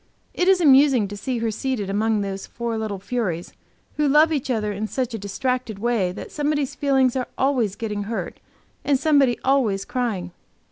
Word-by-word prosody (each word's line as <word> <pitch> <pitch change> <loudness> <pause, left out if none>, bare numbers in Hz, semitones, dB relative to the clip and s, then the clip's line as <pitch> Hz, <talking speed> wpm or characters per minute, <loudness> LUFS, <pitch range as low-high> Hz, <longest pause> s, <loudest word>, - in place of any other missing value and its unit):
It 360 - 0
is 380 -1 +5
amusing 270 - +5
to 205 - -6
see 245 +5 -3
her 225 -1 -1
seated 225 -2 -2
among 210 +2 +1
those 195 -1 -4
four 235 -1 -4
little 215 -2 -3
furies, 190 -5 -3 0.4
who 300 -1 +2
love 305 +3 +5
each 275 -3 -2
other 215 -4 0
in 210 +2 -3
such 250 0 -3
a 225 - -3
distracted 240 +2 -2
way 215 -4 0
that - - -8
somebody's 295 -2 -1
feelings 265 -3 +2
are 255 -1 -1
always 250 -7 +1
getting 210 -2 -4
hurt, 225 +2 -4 0.4
and 285 -2 +2
somebody 280 -5 +3
always 235 -8 +2
crying. 215 -8 -2
240 Hz, 180 wpm, -23 LUFS, 205-270 Hz, 0.4 s, is